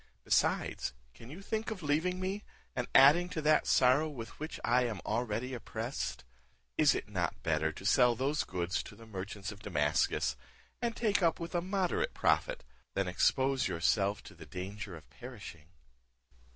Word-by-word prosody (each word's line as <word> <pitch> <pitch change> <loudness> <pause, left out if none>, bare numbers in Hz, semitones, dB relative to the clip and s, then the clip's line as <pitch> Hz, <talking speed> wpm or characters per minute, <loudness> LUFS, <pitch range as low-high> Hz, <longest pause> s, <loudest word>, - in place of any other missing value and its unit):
Besides, - - +1 0.2
can 115 - -13
you 175 +8 -9
think 220 +2 -2
of 205 -6 -6
leaving 160 +5 +1
me, 190 +3 -3 0.3
and 125 -1 -2
adding 160 +6 +7
to 160 - -3
that 155 0 +4
sorrow 130 +5 +4
with 115 -7 -7
which 155 +2 -5
I 125 +1 +3
am 110 -5 -3
already 120 +3 -1
oppressed? 110 - -4 0.5
Is - - +5
it - - -3
not - - -2
better 80 -1 +1
to 95 - -10
sell 120 +3 +5
those 140 +5 0
goods 90 +1 -2
to - - -11
the 115 - -13
merchants 100 -1 -6
of 100 - -11
Damascus, 75 -8 +1 0.5
and 235 -1 -1
take 210 -4 +1
up 165 -2 +2
with 170 +1 -6
a 175 - +1
moderate 195 - -1
profit, - - +1 0.3
than - - +1
expose 135 0 +2
yourself 100 +4 +1
to - - -12
the 80 -3 -13
danger 95 +2 -6
of 80 -2 -13
perishing?" 105 -11 -10
125 Hz, 165 wpm, -32 LUFS, 100-165 Hz, 0.5 s, adding